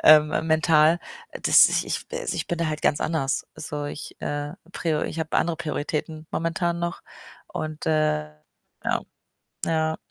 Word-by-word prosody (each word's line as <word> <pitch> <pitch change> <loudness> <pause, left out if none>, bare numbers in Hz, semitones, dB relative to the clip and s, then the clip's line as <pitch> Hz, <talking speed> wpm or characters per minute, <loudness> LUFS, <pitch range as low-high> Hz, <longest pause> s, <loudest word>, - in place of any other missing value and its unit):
ähm, 155 0 +8 0.2
mental, 160 0 +5 0.4
dass - - +8
ich - - 0
ich - - -3
also, 485 +1 -2
ich - - -2
bin 175 - -2
da 170 - +1
halt 155 0 -3
ganz 145 - +2
anders. 155 -4 0
So, 145 0 -5
ich, 145 +1 -6
äh, 145 0 -3 0.2
prio 155 -3 0
ich - - -3
habe 160 0 -1
andere 170 -1 +1
Prioritäten 155 0 -3
momentan 170 +1 0
noch 170 0 -3 0.4
und, 155 -1 -5
äh 155 - +2 0.5
ja, - - +1 0.7
ja. 160 -1 +1
155 Hz, 155 wpm, -25 LUFS, 150-165 Hz, 0.7 s, ähm